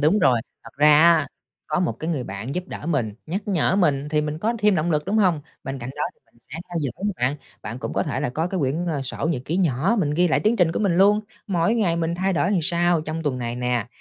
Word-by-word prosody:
đúng 155 +8 +3
rồi. 130 - +3 0.2
Thật - - -11
ra 150 +1 +6
á, 165 -3 +5 0.4
có 155 +2 0
một 180 - +1
cái 160 +2 -3
người 135 -6 -2
bạn 100 +7 -6
giúp 180 +1 -3
đỡ 150 - -7
mình, 125 -10 -1
nhắc 195 +6 -4
nhở 190 0 +2
mình 150 -6 +1
thì 150 0 +1
mình 150 0 -3
có 225 +7 0
thêm 210 -2 +3
động 170 +1 0
lực, 150 -2 +1
đúng 200 +4 -1
hông? 180 -7 +3 0.2
Bên 135 +1 -4
cạnh 120 +1 -6
đó 150 - -2
thì - - -38
mình - - -27
sẽ 155 +7 -9
theo 175 -1 -3
dõi 140 -5 -2
nè 205 - 0
bạn, 130 +4 0 0.3
bạn 120 - -6
cũng - - -5
có - - 0
thể 140 -3 -3
là 145 - -1
có 160 +6 -1
cái 185 -2 -2
quyển, 150 +6 -1
ờ, 150 -5 -1
sổ 135 +2 -3
nhật 130 -7 -2
ký 165 - -2
nhỏ 180 - +1
mình 150 -6 +1
ghi 175 +3 +3
lại 155 - +2
tiến 220 +3 +2
trình 170 -4 +3
của - - -2
mình 190 -5 +1
luôn: 205 +3 +5 0.3
mỗi 190 +3 +1
ngày 185 -7 +1
mình 170 0 -1
thay 190 +2 0
đổi 180 +2 +1
sao 175 0 +3
trong 155 +1 -4
tuần 140 -4 -1
này 120 -1 -4
nè, 125 -3 -1
160 Hz, 280 wpm, -23 LUFS, 140-180 Hz, 0.4 s, ra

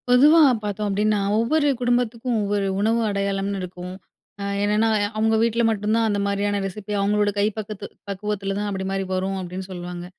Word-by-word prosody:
பொதுவா 290 +7 +7 0.2
பாத்தோம் 210 0 -2
அப்டீன்னா, 210 +1 +1 0.2
ஒவ்வொரு 290 +6 +2
குடும்பத்துக்கும் 245 -1 0
ஒவ்வொரு 200 -1 0
உணவு 225 +3 +2
அடையாளம்னு 200 0 -1
இருக்கும். 180 0 -7 0.5
அ - - -3 0.2
என்னன்னா 210 +2 +2 0.3
"அவங்க 220 +1 +2
வீட்ல 230 +1 +2
மட்டுந்தான் 220 +1 +1
அந்த 205 -1 0
மாரியான 200 0 0
ரெசிப்பியா, 205 +1 -4
அவங்களோட 205 +1 +2
கை 205 - +3
பக்கத்து 210 -1 -6 0.2
பக்குவத்துல 195 0 -3
தான் 205 0 -2
அப்டி 190 -1 -3
மாரி 195 0 -1
வரும்." 190 +1 -1
அப்டீன்னு 185 +1 -6
சொல்வாங்க. 175 -1 -6
205 Hz, 160 wpm, -23 LUFS, 195-220 Hz, 0.5 s, பொதுவா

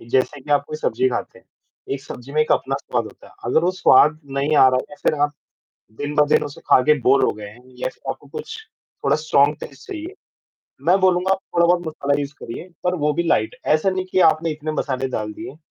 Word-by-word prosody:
जैसे 130 +4 -1
कि 145 - -12
आप 145 0 +3
कोई 155 - -5
सब्ज़ी 130 -3 0
खाते 125 - -4
हैं, - - -24 0.5
एक 135 - -7
सब्ज़ी 130 -1 -10
में 155 - +2
एक 155 - +1
अपना 135 - 0
स्वाद 125 -4 -2
होता 110 - -13
है, - - -17
अगर 125 +6 +2
वो 180 - +3
स्वाद 150 -3 +5 0.2
नहीं 150 +2 +1
आ 135 - +8
रहा 130 - +2
है 130 - -1
या 145 - -11
फिर - - +2
आप 145 0 +2 0.7
दिन-ब-दिन 145 +1 +2
उसे 145 - -9
खाके 145 +4 +6
बोर 130 +3 +4
हो - - +1
गए 105 -1 -9
हैं 120 +4 -17 0.2
या - - -1
फ़िर - - -10
आपको - - -6
कुछ 450 0 -7 0.5
थोड़ा - - +4
स्ट्रॉंग 150 -1 +3
टेस्ट - - -11
चाहिए, 350 -1 -6 0.7
मैं 185 +3 +5
बोलूँगा 185 0 +2
आपक 190 - -2
थोड़ा-बहुत 175 0 +3
मसाला 145 -2 -1
यूज़ 140 0 -4
करिए 170 +10 -7 0.2
पर 180 0 +1
वो 150 - +3
भी 170 - 0
लाइट, 110 -10 +1
ऐसा 155 +5 +3
नहीं 185 0 -2
कि 185 - +3
आपने 160 +1 -2
इतने 155 0 -4
मसाले 135 -3 -2
डाल 105 -4 -4
दिए 155 +4 -9
150 Hz, 225 wpm, -21 LUFS, 130-170 Hz, 0.7 s, आ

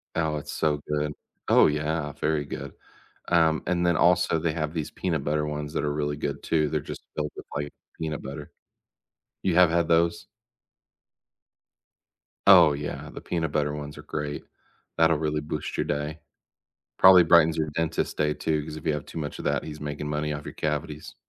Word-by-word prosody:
Oh, 80 -2 0
it's 75 - -7
so 75 -2 +1
good. 75 0 -1 0.3
Oh, - - +6
yeah 75 0 -1
very 75 -1 -1
good. 70 -1 -7 0.6
Um, 80 -2 +3
and 90 0 +1
then 85 -1 +3
also 90 -1 +3
they 80 -1 -1
have 75 -1 -3
these 80 -3 -3
peanut 80 -7 -2
butter 75 +1 0
ones 75 0 -4
that - - -1
are 75 0 0
really 75 -1 -2
good 70 -1 -3
too, 75 -2 +1
they're, 75 - 0
just, - - -8
filled 75 -1 -2
with, - - -9
like, 75 0 -3 0.3
peanut 80 -2 -3
butter. 70 +2 -7 0.9
You 90 -3 +1
have 90 -2 +7
had 85 -1 +1
those? 85 0 +2 2.2
Oh, 85 -6 +8
yeah, 75 0 -5
the - - -8
peanut 80 -4 -2
butter 75 -1 0
ones 75 0 -7
are 75 - -10
great. 75 -1 -4 0.5
That'll 80 -1 +4
really 75 -1 -1
boost 75 0 -5
your - - 0
day. 75 +2 -3 0.8
Probably 95 -1 +9
brightens 80 -1 +5
your 80 -1 0
dentist's 80 0 -1
day 75 -1 0
too, 75 -2 -1
'cause 75 0 -7
if 80 - -9
you 80 - +3
have 75 -2 -4
too - - -7
much 75 -1 -5
of - - -7
that - - 0
he's 75 -1 -8
making 75 0 -4
money 75 0 -1
off 75 0 -5
your - - -8
cavities. 75 0 -3
75 Hz, 190 wpm, -26 LUFS, 75-80 Hz, 2.2 s, Probably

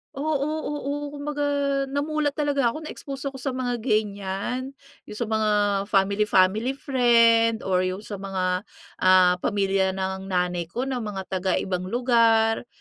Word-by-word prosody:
Oo, 305 +3 -2 0.4
oo. 290 -1 -3 0.2
Kumbaga, 290 0 -3 0.4
namulat 290 +1 -1
talaga 285 -4 +1
ako, 310 +7 -3
na-expose 275 -2 -6
ako 265 - -10
sa 260 0 -3
mga 245 -2 -2
ganyan. 215 +3 -2 0.3
Yung 210 - -8
sa 235 - -2
mga 220 -1 0 0.4
family-family 200 +3 +2
friend, 230 -4 +3
or 185 -1 +1
yung 185 +3 -2
sa 205 -2 -7
mga, 195 -1 -3 0.6
ah, 185 -1 +5
pamilya 195 -1 0
ng 190 0 -4
nanay 180 -2 -1
ko 240 +9 -3
na 265 -2 -2
mga 205 -4 -5
taga-ibang 185 0 -1
lugar. 230 -1 +2
220 Hz, 135 wpm, -24 LUFS, 190-260 Hz, 0.6 s, ah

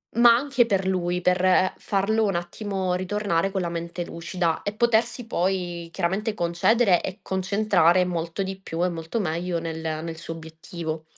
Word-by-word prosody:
ma 235 0 +7
anche 265 -1 +2
per 195 -4 0
lui, 180 -1 0
per 185 +1 +3
farlo 210 +3 +1
un 195 -4 0
attimo 185 +1 -2
ritornare 190 -1 0
con 190 - -1
la 170 - -2
mente 170 +1 -4
lucida 170 0 -2
e 205 - -2
potersi 235 +1 +1
poi 175 -4 -2
chiaramente 195 +5 -1
concedere 175 +3 +3
e 190 +3 -5
concentrare 190 -2 +2
molto 170 +1 -3
di 190 0 -5
più 175 -2 -3
e - - +1
molto 165 +5 -4
meglio 170 -1 -1
nel 165 -1 -5
nel 160 +1 -4
suo 165 0 -6
obiettivo. 160 0 -6
180 Hz, 160 wpm, -25 LUFS, 170-205 Hz, -, ma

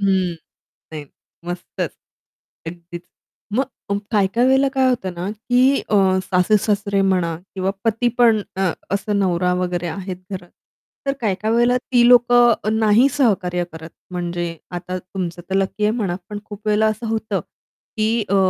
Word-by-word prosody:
हं, 190 -3 +1 0.6
नाही 150 -2 -6 0.4
मस्तच! 175 +1 -4 0.8
अगदीच. 170 +1 -8 0.6
मग 260 -6 -2
काही-काही 215 +4 +2
वेळेला 265 +1 +4
काय 265 -1 +3
होतं 190 -8 -1
ना, 175 +3 -4
की 250 +5 +2
अ, 210 - +2 0.3
सासू-सासरे 200 +2 +1
म्हणा 180 -4 +1 0.2
किंवा 190 0 0
पती, 225 +1 +1
पण 230 -3 +5 0.2
अ, 190 -2 +2 0.2
असं 200 +1 0
नवरा 180 -2 +1
वगैरे 180 -1 -2
आहेत 185 +2 -5 0.2
घरात. 180 -2 -6 0.6
तर 275 - +2
काही-काही 215 +1 0
वेळेला 240 +1 +4
ती 245 -1 +3
लोकं 240 -2 +5
नाही 220 +4 +5
सहकार्य 190 -9 +1
करत. 160 0 -9 0.2
म्हणजे, 175 -1 -3
आता 180 +1 -4
तुमचं 180 -1 -5
तर 190 - 0
लकी 195 +2 0
आहे 210 - +3
म्हणा, 195 -6 -1
पण 210 -1 -5
खूप 205 0 -10
वेळेला 210 +1 +3
असं 215 +2 -2
होतं, 220 -2 -1 0.6
की 215 0 +2 0.2
अ, 200 - +2
200 Hz, 145 wpm, -20 LUFS, 180-225 Hz, 0.8 s, पण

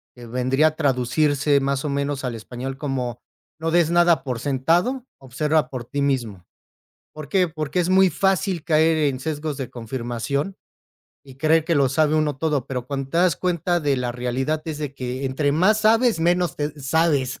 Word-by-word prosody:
que 120 -1 -11
vendría 130 +5 +2
a 155 - -2
traducirse 145 +1 +1
más 140 +1 -1
o - - -1
menos 140 0 -2
al 125 -2 -3
español 125 +4 -6
como, 130 -4 -3 0.4
no 165 0 -2
des 170 -1 +3
nada 170 -4 +4
por 125 -4 -3
sentado, 165 - 0
observa 145 +2 0
por 125 -3 -6
ti 140 +3 -3
mismo. 120 -10 -1 0.7
¿Por 155 -2 -9
qué? 180 0 +2
Porque, 155 +2 -2
es 175 - 0
muy 190 0 +5
fácil 190 -3 0
caer 160 0 +3
en 140 -4 0
sesgos 150 0 -3
de 130 -3 -4
confirmación 125 - -4 0.7
y 135 -2 -14
creer 155 +3 +2
que 165 +1 0
lo 140 -2 +4
sabe 155 +2 +2
uno 150 -3 0
todo 150 -4 -1
pero, 125 -2 -5
cuando 135 -1 -4
te 165 - 0
das 180 -3 +3
cuenta 175 -1 0
de 145 -3 +1
la 125 -1 -2
realidad, 130 +5 -2
es 155 -2 -5
de 145 -2 -4
que 130 +1 -4
entre 140 +2 0
más 190 +8 +3
sabes, 225 -1 +3
menos 175 0 +1
te 150 +1 -4
sabes, 140 -2 +1
145 Hz, 185 wpm, -22 LUFS, 130-160 Hz, 0.7 s, muy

